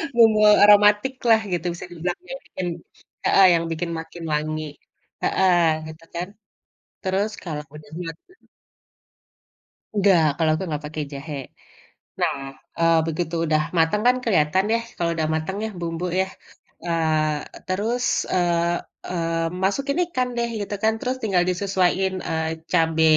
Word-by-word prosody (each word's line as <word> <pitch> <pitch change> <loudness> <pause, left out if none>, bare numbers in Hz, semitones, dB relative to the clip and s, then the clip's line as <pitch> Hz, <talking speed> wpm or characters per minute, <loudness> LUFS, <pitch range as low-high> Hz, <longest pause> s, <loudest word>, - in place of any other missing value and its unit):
Bumbu 225 -2 +6 0.2
aromatik 210 +4 +6 0.2
lah 225 -1 +7
gitu 175 0 -2
bisa 175 - -8
dibilang 175 +1 -3
yang - - -5
bikin 185 -1 -5 0.6
heeh, 195 - +6
yang 170 0 +2
bikin 170 +1 -3
makin 165 +1 -9
wangi, 155 +1 -1 0.6
heeh, 185 -2 +3 0.3
gitu 160 +1 -11
kan, 175 +1 -2 0.7
terus 195 +3 0
kalau 150 -4 -4
udah 150 -1 -13
mateng 165 - -11 1.5
Enggak, 195 -5 +4 0.2
kalau 160 -1 +3
aku 160 - -4
nggak 150 0 -3
pakai 155 0 -4
jahe. 145 +2 -6 0.9
Nah, - - +2 0.4
eee, 165 -1 +4
begitu 165 +1 -2
udah 155 -1 +2 0.2
mateng 165 +6 +3
kan 250 - +5
keliatan 185 -4 +2
deh 230 0 +2
kalau 170 -1 0
udah 160 -1 0
mateng 160 +5 -3
ya 220 - -3
bumbu 170 +1 -3
ya, 190 - -1 0.6
eee, 155 -3 +1 0.2
terus, 225 +7 -1 0.3
eee, 175 -1 +1 0.3
eee, 165 -1 -1 0.2
masukin 275 - 0
ikan 255 -7 -1
deh 235 0 +1
gitu 205 - -4
kan, 220 0 +4
terus 255 +2 -2
tinggal 190 -5 +2
disesuaiin, 190 0 +1 0.2
eee, 160 0 -2
cabe 165 -2 +3
175 Hz, 140 wpm, -23 LUFS, 160-200 Hz, 1.5 s, lah